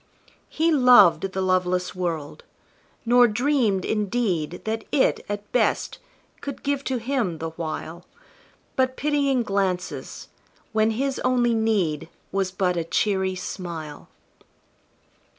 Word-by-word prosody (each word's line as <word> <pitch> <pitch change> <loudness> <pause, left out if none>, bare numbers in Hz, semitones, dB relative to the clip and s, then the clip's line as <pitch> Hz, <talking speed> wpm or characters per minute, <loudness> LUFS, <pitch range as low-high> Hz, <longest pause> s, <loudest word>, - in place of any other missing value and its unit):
He 325 +2 +1
loved 250 - +6
the 190 0 -2
loveless 185 -1 0
world, 170 - -4 0.6
nor 245 +1 +6
dreamed, 230 -4 +1
indeed, 200 -6 -1
That 220 0 -3
it, 275 - +2
at 205 0 -5
best, 250 - 0 0.4
could 280 -2 -7
give 280 -1 -1
to 260 - -1
him, 230 -8 -1
the 160 +1 -5
while, 165 +1 -6 0.7
But 260 0 +1
pitying 280 -4 +1
glances, 190 -4 -3 0.4
when 220 -1 +2
his 265 +4 -1
only 245 -2 +2
need 200 -10 0 0.2
Was 195 -1 0
but 185 -1 0
a 170 - 0
cheery 190 +2 0
smile. 170 -5 -7
205 Hz, 115 wpm, -24 LUFS, 180-250 Hz, 0.7 s, loved